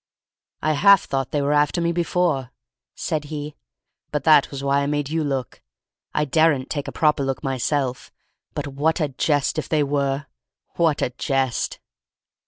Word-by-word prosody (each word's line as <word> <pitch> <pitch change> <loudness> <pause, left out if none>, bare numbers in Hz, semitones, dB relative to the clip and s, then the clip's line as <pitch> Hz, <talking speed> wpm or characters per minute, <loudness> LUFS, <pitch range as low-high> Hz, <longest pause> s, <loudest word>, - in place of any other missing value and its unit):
"I 155 +1 +2
half 195 +5 +6
thought 135 -1 -2
they 145 -1 -1
were 145 +1 +1
after 150 +4 +2
me 170 0 +1
before," 170 -6 0 0.5
said 155 -3 -2
he. 150 0 -6 0.6
"That 150 0 +4
was 140 -1 -6
why 140 0 +2
I 140 - -1
made 145 0 -1
you 160 0 0
look. 135 -3 -3 0.5
I 150 - 0
daren't 150 -2 +2
take 145 -2 -3
a - - -4
proper 150 -2 +2
look 135 -1 -3
myself, 135 0 -1 0.4
but - - -3
what 145 +5 0
a 150 -3 0
jest 145 +1 0
if - - -5
they 155 -2 +2
were! 140 0 -1 0.5
What 165 -4 +2
a - - -1
jest!" 135 -1 -1
145 Hz, 165 wpm, -23 LUFS, 135-155 Hz, 0.6 s, half